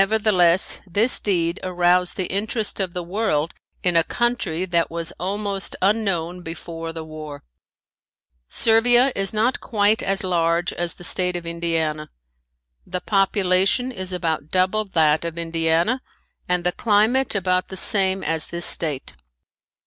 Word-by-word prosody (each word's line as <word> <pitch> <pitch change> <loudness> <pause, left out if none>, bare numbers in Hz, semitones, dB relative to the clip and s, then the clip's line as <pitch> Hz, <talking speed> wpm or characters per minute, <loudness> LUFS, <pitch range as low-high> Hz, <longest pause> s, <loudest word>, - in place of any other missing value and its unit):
Nevertheless, 195 -4 +2
this 210 +8 +3
deed 170 -3 0
aroused 180 0 +1
the 185 - -2
interest 210 +4 -2
of 185 -3 -2
the 180 - -4
world 170 -4 -1 0.3
in 180 -1 +2
a 165 - +5
country 215 -8 -1
that 170 -2 0
was 165 0 -3
almost 200 +1 -2
unknown 185 -4 0
before 165 -1 -7
the 165 -1 -7
war. 155 -2 -9 1.1
Servia 240 +3 +4
is 195 -1 0
not 225 +4 0
quite 210 0 +1
as 195 0 -1
large 170 -1 0
as 175 -1 -3
the - - -13
state 180 0 +2
of 175 -1 -4
Indiana. 165 -2 -2 0.7
The 180 - -4
population 195 +4 +2
is 185 -5 -5
about 160 -4 -2
double 190 +4 +1
that 160 -5 +2
of 170 0 -5
Indiana 165 +8 0 0.5
and 180 -1 +1
the 180 - +1
climate 220 +6 +1
about 185 -1 0
the 190 - -8
same 190 -1 +3
as 160 -1 0
this 170 0 -3
state. 150 -5 -2
180 Hz, 140 wpm, -22 LUFS, 170-205 Hz, 1.1 s, a